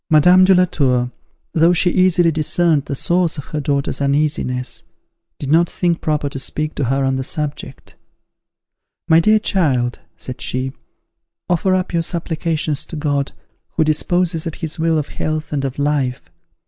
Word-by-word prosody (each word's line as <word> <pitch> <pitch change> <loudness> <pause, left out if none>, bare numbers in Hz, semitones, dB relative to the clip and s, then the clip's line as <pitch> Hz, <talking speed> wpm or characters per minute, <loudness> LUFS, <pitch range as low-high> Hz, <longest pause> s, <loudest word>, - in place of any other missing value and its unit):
Madame 180 +4 +6
de 190 0 +5
la 180 0 +5
Tour, 125 -7 0 0.4
though 165 +2 +4
she 180 +1 +2
easily 180 -2 +3
discerned 155 -1 +2
the 140 - -4
source 170 +3 +1
of 145 - -6
her 155 - -4
daughter's 140 -1 -1
uneasiness, 140 -3 0 0.6
did 140 -1 -4
not 170 +2 +4
think 175 -2 -1
proper 150 -2 0
to 140 -1 -5
speak 155 +3 -3
to 140 - -2
her 135 +3 0
on 135 0 0
the 130 - -2
subject. 145 -1 -5 1.1
"My 165 -1 +6
dear 215 +6 +4
child," 140 - 0 0.2
said 125 -1 -6
she, 130 +1 -1 0.8
"offer 185 +2 +2
up 185 -1 -2
your 170 - +2
supplications 160 -3 -1
to - - -8
God, 145 -2 -1 0.4
who - - +2
disposes 165 +2 0
at 165 - -4
his 160 0 -4
will 165 0 +2
of 150 - -2
health 155 0 -3
and 140 -2 -1
of 135 -1 -3
life. 140 - -1
155 Hz, 165 wpm, -18 LUFS, 140-170 Hz, 1.1 s, Madame